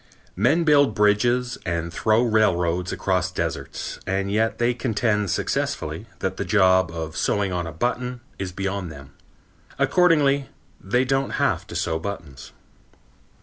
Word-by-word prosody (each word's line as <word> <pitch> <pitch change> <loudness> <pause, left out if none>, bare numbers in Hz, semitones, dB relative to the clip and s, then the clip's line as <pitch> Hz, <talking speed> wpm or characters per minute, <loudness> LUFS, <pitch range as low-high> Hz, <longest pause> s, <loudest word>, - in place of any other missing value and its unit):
Men 135 - +3
build 145 -7 +4
bridges 120 +4 +2
and 85 -2 -3
throw 110 +2 +2
railroads 90 -6 +1
across 90 -2 0
deserts, - - -4
and 95 +1 -1
yet 110 +2 +1
they 120 +1 +2
contend 110 -4 0
successfully - - -2
that - - -2
the - - -1
job 95 -4 +4
of 80 -1 -5
sewing 100 -2 0
on 90 -2 -2
a - - -5
button 125 +7 -2 0.2
is 95 -2 -3
beyond 95 -1 -3
them. 70 -2 -12 0.7
Accordingly, 145 -6 +3 0.3
they 125 +7 +1
don't 135 +1 0
have - - 0
to - - -9
sew 80 0 -1
buttons. 80 -8 -7
100 Hz, 140 wpm, -23 LUFS, 90-125 Hz, 0.7 s, build